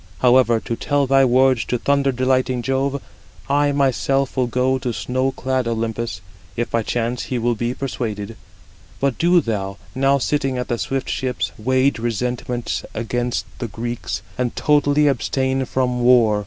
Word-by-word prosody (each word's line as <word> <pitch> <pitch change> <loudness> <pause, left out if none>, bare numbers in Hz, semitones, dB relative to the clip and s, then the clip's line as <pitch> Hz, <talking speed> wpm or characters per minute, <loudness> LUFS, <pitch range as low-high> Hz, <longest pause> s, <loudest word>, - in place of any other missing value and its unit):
However, 125 -2 +4
to 115 - -3
tell 145 +3 0
thy 135 +1 +4
words 130 -1 +3
to 125 - -1
thunder 140 +2 +2
delighting 130 -1 +1
Jove, 135 +1 -1 0.4
I 145 +1 +2
myself 135 -1 +1
will 125 -1 +1
go 130 +2 +1
to 125 -2 -2
snow 130 +3 -1
clad 130 -1 -1
Olympus, 115 -4 -2 0.4
if 120 - -2
by 115 - +1
chance 120 +2 -2
he 125 - -2
will 120 +1 +1
be 120 +2 -2
persuaded. 115 -5 -4 0.6
But 135 -2 0
do 175 +1 +4
thou, 100 -5 -3 0.2
now 135 +1 +3
sitting 135 -1 0
at 125 - -3
the 120 - -1
swift 135 -1 -2
ships, 125 -3 -2
wage 130 +3 +1
resentment 120 +1 -2
against 120 +2 -2
the 120 - -3
Greeks, 120 +2 -4 0.2
and 125 -2 -1
totally 150 0 +3
abstain 130 +1 0
from 125 -1 -1
war. 120 -4 +5
125 Hz, 155 wpm, -21 LUFS, 120-135 Hz, 0.6 s, war